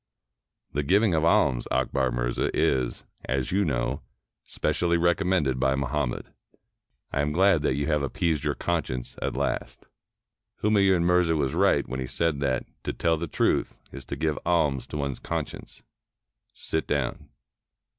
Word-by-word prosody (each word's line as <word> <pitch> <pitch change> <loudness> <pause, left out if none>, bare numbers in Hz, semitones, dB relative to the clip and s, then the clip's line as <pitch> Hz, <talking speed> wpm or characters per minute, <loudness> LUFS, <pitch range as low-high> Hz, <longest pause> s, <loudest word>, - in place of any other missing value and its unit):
"The 75 - +1
giving 100 +6 +3
of 80 -1 +2
alms, 65 -7 +3
Akbar 65 -2 +1
Mirza, - - -1
is, 65 -2 +1 0.2
as 65 0 -1
you 100 +2 +2
know, 65 -8 -1 0.4
specially 85 -1 0
recommended 85 -6 +1
by 65 0 +2
Muhammad. 70 -1 -2 0.9
I 70 - 0
am 75 +1 0
glad 95 0 +4
that 75 - +1
you 70 +1 -1
have 75 -1 +1
appeased 75 +2 -1
your - - 0
conscience 65 -8 -2
at - - -2
last. - - -3 0.8
Humayun 100 -4 +4
Mirza 90 -1 +3
was 70 -4 0
right - - +3
when 65 +1 -4
he 65 - -3
said 80 -1 0
that 70 -2 0
' - - -45
to - - -1
tell 85 -1 +1
the 85 +2 -4
truth - - 0
is 70 - -8
to 70 - -5
give 75 +1 -1
alms 75 -6 +1
to - - -5
one's 70 -2 -3
conscience.' - - -5 0.7
Sit 80 - -3
down." 70 -4 -2
75 Hz, 155 wpm, -26 LUFS, 65-85 Hz, 0.9 s, glad